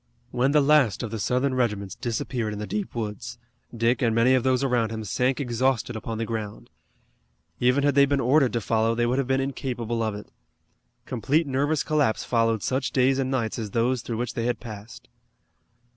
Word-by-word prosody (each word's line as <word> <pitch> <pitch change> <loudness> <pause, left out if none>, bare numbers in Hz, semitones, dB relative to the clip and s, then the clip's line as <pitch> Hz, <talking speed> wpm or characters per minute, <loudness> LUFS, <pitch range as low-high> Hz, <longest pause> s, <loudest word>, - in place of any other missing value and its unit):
When 125 +3 +1
the 150 0 +4
last 140 -8 +3
of 115 - -4
the 115 - -4
Southern 125 +7 0
regiments 105 -6 -1
disappeared 115 -1 -3
in - - -6
the 105 - -4
deep 205 - -4
woods, 115 +1 -5 0.4
Dick 115 +3 +1
and 115 -3 +2
many 120 +3 +4
of 130 - +3
those 130 +1 +1
around 120 -4 +1
him 110 -1 -5
sank 125 +6 0
exhausted 125 -2 0
upon 110 +1 -5
the 115 - -2
ground. 105 - -6 0.9
Even 125 +3 +3
had 145 0 +3
they 140 0 +5
been 140 0 +1
ordered 130 +1 +3
to 120 - 0
follow 115 +1 +1
they 120 0 +1
would 125 +3 +1
have 135 - -1
been 135 0 +1
incapable 120 -4 -3
of 110 -2 -1
it. 105 - -10 0.7
Complete 140 +7 0
nervous 145 +3 0
collapse 150 -8 +1
followed 115 -3 +1
such 130 +2 -1
days 130 +1 +2
and 130 -1 0
nights 120 -4 -1
as 110 -2 -4
those 120 +3 0
through 115 -1 -4
which 120 0 -3
they 115 0 -2
had 120 -2 -1
passed. 110 -2 -10
120 Hz, 200 wpm, -25 LUFS, 115-130 Hz, 0.9 s, they